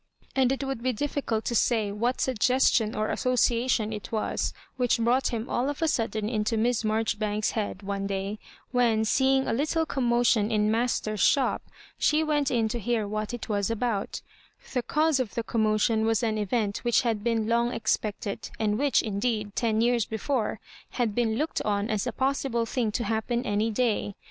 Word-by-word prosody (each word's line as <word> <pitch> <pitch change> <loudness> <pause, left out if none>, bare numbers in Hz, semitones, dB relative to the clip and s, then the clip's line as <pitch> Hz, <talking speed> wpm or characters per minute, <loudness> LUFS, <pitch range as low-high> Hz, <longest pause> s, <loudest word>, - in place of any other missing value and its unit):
And 260 -1 +3
it 270 +1 -1
would 270 -3 -3
be 255 +1 0
difficult 240 -3 -2
to - - -1
say 220 -2 +2
what 235 +5 -1
suggestion 250 -2 +2
or 215 0 -1
association 240 -3 +1
it 210 - -7
was 220 -1 -1 0.2
which 245 -2 +2
brought 240 +3 +2
him 230 -1 -3
all 255 +3 0
of 290 - -4
a - - +3
sudden 220 -6 -1
into 220 0 0
Miss 235 +1 +1
Marjori 220 -1 0
banks's 210 0 0
head, 205 -3 -3
one 195 0 -3
day, 195 +2 -3 0.3
when, 235 -3 +2
seeing 265 +3 +2
a - - 0
little 310 +6 0
com 270 -5 -2
motion 235 -3 +3
in 215 -1 +2
Master's 225 -2 0
shop, 275 +5 +3 0.4
she 305 +1 +3
went 295 -3 +1
in 230 -3 +1
to 240 +2 -3
hear 225 -1 -1
what 215 0 -3
it 240 -1 -6
was 205 -2 0
about 230 -2 -2 0.5
The 250 - +1
cause 305 +2 +1
of 250 -5 -3
the 235 - -1
commotion 220 0 +1
was 225 0 +1
an 215 -2 0
event 210 0 -1
which 240 -1 +2
had 225 -4 -1
been 225 -2 0
long 235 +1 +2
expected, 215 -2 -2
and 210 0 0
which, 285 -1 +3
indeed, 210 -1 -2
ten 225 -2 +1
years 235 -1 +2
before, 225 +1 -2 0.4
had 235 -4 +1
been 225 -1 +1
looked 305 +7 -1
on 205 0 -1
as 215 -2 -1
a - - 0
possible 265 -3 0
thing 230 -2 -1
to 235 - -1
happen 225 +3 -1
any 210 +2 +1
day. 220 -3 0
230 Hz, 190 wpm, -27 LUFS, 215-250 Hz, 0.5 s, And